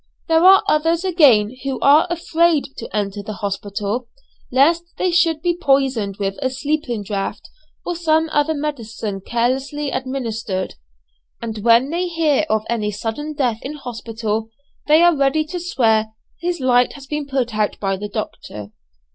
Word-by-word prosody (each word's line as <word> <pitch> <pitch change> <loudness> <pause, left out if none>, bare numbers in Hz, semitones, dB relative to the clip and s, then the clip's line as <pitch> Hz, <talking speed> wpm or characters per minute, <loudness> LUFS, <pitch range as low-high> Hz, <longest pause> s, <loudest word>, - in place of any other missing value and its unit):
There 325 0 +3
are 385 +1 +8
others 325 +3 +2
again 260 - +4
who 270 -2 -2
are 290 +4 +6
afraid 335 -3 +1
to 230 - -7
enter 205 -1 -2
the 215 +1 -6
hospital 205 +4 -3 0.4
lest 310 +7 +4
they 365 - +1
should 330 -3 +2
be 350 -1 +1
poisoned 270 - +1
with 195 -1 -3
a 260 - +1
sleeping 270 -4 -2
draught, 195 -1 -4 0.3
or 350 - -2
some 320 -1 +2
other 295 +1 +1
medicine 230 -9 -4
carelessly 265 +5 -1
administered; 225 -7 -3 0.7
and 220 -2 -5
when 235 +5 +4
they 355 +2 -1
hear 315 -3 +1
of 215 -1 +1
any 220 -3 -1
sudden 225 +9 -4
death 245 -6 0
in 275 - -5
hospital 225 -5 -4 0.4
they 310 +3 +6
are 345 -1 +5
ready 280 +2 +2
to 355 +3 -5
swear 225 -10 +2 0.3
"his 350 -1 -2
light 250 -1 +3
has 280 -1 -11
been 295 0 -4
put 260 -4 -1
out 210 -1 -1
by 195 -1 0
the 205 +2 -6
doctor." 105 - -6
265 Hz, 155 wpm, -20 LUFS, 220-310 Hz, 0.7 s, are